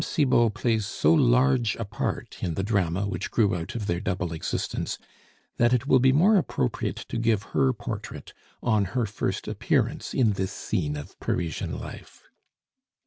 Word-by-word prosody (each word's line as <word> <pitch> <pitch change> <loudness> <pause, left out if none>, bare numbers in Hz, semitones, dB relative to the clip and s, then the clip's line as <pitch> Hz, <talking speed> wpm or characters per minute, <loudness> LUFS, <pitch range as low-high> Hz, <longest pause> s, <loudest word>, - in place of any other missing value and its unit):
Cibot 120 -7 +2
plays 110 -4 0
so 120 - +3
large 125 -4 +3
a 115 - -4
part 100 - -4
in 85 -3 -2
the 95 - -1
drama 100 -2 0
which 95 -1 -3
grew 105 -5 +2
out 85 +4 -5
of 110 -3 -3
their 85 -3 0
double 90 -2 -2
existence, 80 - -3 0.6
that 120 +1 +4
it 125 +1 +1
will 130 -2 +5
be 130 +1 +5
more 190 +10 +5
appropriate 65 - -1
to - - -2
give 115 -3 +2
her 135 -1 +3
portrait 115 - -7 0.3
on 110 -4 +2
her 120 - +2
first 105 0 -3
appearance - - -1
in 115 -5 +4
this 95 0 -2
Scene 80 -8 -2
of 75 - -10
Parisian 85 -2 -2
Life. - - -10
110 Hz, 165 wpm, -26 LUFS, 95-125 Hz, 0.6 s, will